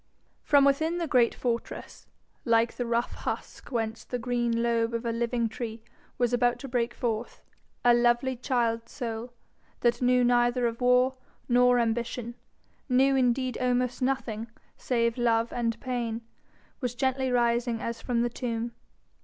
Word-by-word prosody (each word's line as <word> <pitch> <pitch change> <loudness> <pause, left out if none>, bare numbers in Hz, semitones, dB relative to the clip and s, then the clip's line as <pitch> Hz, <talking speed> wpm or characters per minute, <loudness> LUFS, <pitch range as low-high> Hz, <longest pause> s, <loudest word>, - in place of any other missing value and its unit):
From 285 -2 +4
within 315 +5 +2
the 345 - -1
great 250 -6 +3
fortress, 235 -2 -4 0.4
like 230 -1 +3
the 245 - -3
rough 235 +1 0
husk - - -5
whence 225 -3 -2
the 250 - -4
green 240 -1 0
lobe 230 0 +1
of 230 +1 -3
a 230 - 0
living 235 0 0
tree 225 0 -6 0.3
was 245 -1 +1
about 245 0 +2
to 275 - -8
break 240 -1 -1
forth, 235 -1 -3 0.4
a 240 - +7
lovely 240 +2 +2
child 235 -2 -1
soul, 235 -2 -5 0.5
that 240 0 +2
knew 250 0 +4
neither 245 0 +3
of 230 +1 -2
war 250 +1 +3 0.3
nor 250 0 +5
ambition, 235 0 -1 0.6
knew 265 +2 +4
indeed 255 0 +1
almost 250 0 0
nothing 240 -4 -1 0.3
save 235 -1 0
love 230 -1 +2
and 230 -2 -1
pain, 235 -3 -3 0.6
was 250 -4 -3
gently 260 +1 0
rising 235 -1 +1
as 230 0 -4
from 235 -2 0
the 240 - 0
tomb. 235 -1 -3
240 Hz, 150 wpm, -28 LUFS, 230-250 Hz, 0.6 s, a